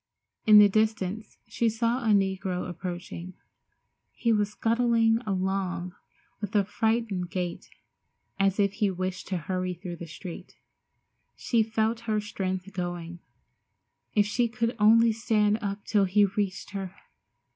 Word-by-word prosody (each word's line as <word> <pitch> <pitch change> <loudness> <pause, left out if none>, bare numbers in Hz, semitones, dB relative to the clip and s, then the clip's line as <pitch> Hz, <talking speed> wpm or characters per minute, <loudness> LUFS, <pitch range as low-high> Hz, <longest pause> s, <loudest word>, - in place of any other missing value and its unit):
In 215 -1 +9
the 210 0 +9
distance 215 0 -1
she 235 - 0
saw 230 +3 0
a - - -2
negro 190 -3 +1
approaching. 175 0 -6 0.8
He 230 -1 +1
was 210 -1 +1
scuttling 230 +1 +2
along 185 -2 -2 0.5
with 205 +1 -5
a 205 - +5
frightened 215 -3 -1
gait, 180 -1 -4 0.7
as 195 +1 +2
if 200 -1 +2
he 210 -2 +1
wished 185 0 -4
to 185 - -1
hurry 185 +2 -3
through 175 0 -7
the 170 - -8
street. 170 +2 -9 0.8
She 235 -2 +1
felt 220 +1 0
her 215 -1 +2
strength 195 -2 -4
going. 175 -2 -5 1.0
If 205 -1 +4
she 235 +3 +1
could 230 +1 -2
only 225 +2 +6
stand 215 -1 +1
up 200 -1 -4
till 205 -3 +3
he 200 +2 +4
reached 200 -1 -3
her! 195 -2 -5
200 Hz, 135 wpm, -27 LUFS, 185-220 Hz, 1.0 s, In